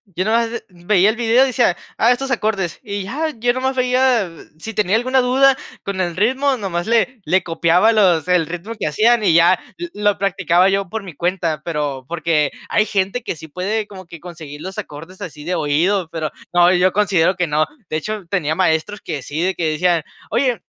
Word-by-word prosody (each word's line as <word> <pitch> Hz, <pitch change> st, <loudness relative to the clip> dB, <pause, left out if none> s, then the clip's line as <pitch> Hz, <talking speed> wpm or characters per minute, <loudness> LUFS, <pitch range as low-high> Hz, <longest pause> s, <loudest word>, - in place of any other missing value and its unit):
Yo 185 Hz, -, 0 dB
nomás, 230 Hz, +2 st, +1 dB
eh, 235 Hz, -, -5 dB
veía 180 Hz, +2 st, +2 dB
el 220 Hz, -, -2 dB
video 240 Hz, +2 st, +4 dB
y -, -, +2 dB
decía, 240 Hz, -7 st, +2 dB, 0.2 s
ah, 235 Hz, +2 st, +4 dB
estos 270 Hz, +2 st, -4 dB
acordes. 210 Hz, -7 st, -1 dB
Y 200 Hz, -3 st, -4 dB
ya, 305 Hz, +11 st, -2 dB
yo 245 Hz, +2 st, +2 dB
nomás 260 Hz, +1 st, -1 dB
veía 250 Hz, -5 st, +2 dB, 0.3 s
si 220 Hz, +7 st, -7 dB
tenía 210 Hz, -1 st, +1 dB
alguna 255 Hz, +3 st, +2 dB
duda 265 Hz, +2 st, +4 dB, 0.3 s
con 195 Hz, -1 st, -4 dB
el 175 Hz, -2 st, -1 dB
ritmo, 260 Hz, +7 st, +2 dB
nomás 190 Hz, -5 st, -3 dB
le 235 Hz, +2 st, +1 dB
le 190 Hz, 0 st, +2 dB
copiaba, 170 Hz, +5 st, +3 dB
los 185 Hz, -8 st, +3 dB
el 180 Hz, -2 st, +3 dB
ritmo 175 Hz, +7 st, -6 dB
que -, -, -1 dB
hacían, 220 Hz, +8 st, +3 dB
y 175 Hz, -, +4 dB
ya 170 Hz, +2 st, +5 dB, 0.2 s
lo 345 Hz, -, -6 dB, 0.2 s
lo -, -, -21 dB
practicaba 185 Hz, -2 st, +2 dB
yo 195 Hz, -1 st, 0 dB
por 220 Hz, +2 st, -4 dB
mi 180 Hz, -5 st, -10 dB
cuenta, 170 Hz, -3 st, -1 dB
pero 145 Hz, -5 st, -3 dB
porque, 165 Hz, -3 st, 0 dB, 0.2 s
hay 215 Hz, -, +2 dB
gente 200 Hz, +4 st, -1 dB
que -, -, -4 dB
sí 160 Hz, 0 st, -11 dB
puede 205 Hz, +6 st, -2 dB
como 190 Hz, -2 st, -11 dB
que 170 Hz, -2 st, -12 dB
conseguir 155 Hz, -4 st, -9 dB
los 190 Hz, +2 st, -7 dB
acordes 180 Hz, -1 st, -8 dB
así 155 Hz, -6 st, -8 dB
de 180 Hz, +3 st, -2 dB
oído, 170 Hz, +6 st, +1 dB
pero 160 Hz, -2 st, -3 dB, 0.2 s
no, 175 Hz, 0 st, +5 dB
yo 180 Hz, +1 st, +3 dB
considero 190 Hz, -3 st, +2 dB
que 180 Hz, -1 st, -1 dB
no. 150 Hz, +1 st, +1 dB, 0.2 s
De 155 Hz, -, -1 dB
hecho, 210 Hz, +4 st, -5 dB
tenía 160 Hz, -6 st, 0 dB
maestros 185 Hz, +3 st, 0 dB
que 150 Hz, -5 st, -5 dB
sí, 150 Hz, +4 st, -4 dB
de 185 Hz, +2 st, 0 dB
que 160 Hz, -2 st, 0 dB
decían: 170 Hz, +1 st, +1 dB, 0.3 s
"Oye, 250 Hz, -2 st, 0 dB
190 Hz, 210 wpm, -19 LUFS, 170-225 Hz, 0.3 s, ya